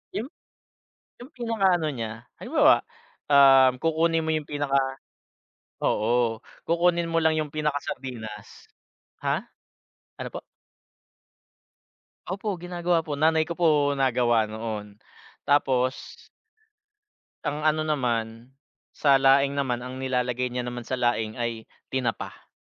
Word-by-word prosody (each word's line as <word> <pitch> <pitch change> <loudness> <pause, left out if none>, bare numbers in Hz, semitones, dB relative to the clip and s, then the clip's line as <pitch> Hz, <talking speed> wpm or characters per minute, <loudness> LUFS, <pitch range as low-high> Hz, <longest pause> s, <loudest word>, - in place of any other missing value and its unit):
Yung 240 +6 -3 0.9
yung 245 +3 -12
pinaka 225 -6 +1
ano 165 -3 -1
niya, 115 -4 -6 0.2
halimbawa, - - +4 0.4
um, 135 -2 +7
kukunin 165 0 +2
mo 160 - -2
yung 155 -2 -2
pinaka 145 -2 0 1.0
oo, 115 +1 +1 0.3
kukunin 170 0 +2
mo 165 - -1
lang 160 -1 +2
yung 155 - -3
pinakasardinas, 130 -8 -5 0.6
ha? - - -1 0.7
Ano - - -4
po? - - -7 1.8
Opo, 195 +1 -3
ginagawa 175 -1 -1
po, 150 - -4
nanay 160 +2 +2
ko 170 - -4
po, 170 -1 +2 0.2
nagawa 120 -5 +2
noon, 105 -2 -6 0.5
tapos 130 -2 +1 1.3
Ang 145 +1 -2
ano 155 0 +2
naman, 120 -5 -2 0.5
sa 140 -2 +4
laing 135 +1 +4
naman 125 -3 -2
ang 130 +1 -7
nilalagay 125 -1 -1
niya 125 0 -3
naman 120 0 -5
sa 130 +2 -4
laing 110 -3 0
ay 115 -2 -4 0.2
tinapa. 125 -3 -3
135 Hz, 115 wpm, -25 LUFS, 120-160 Hz, 1.8 s, um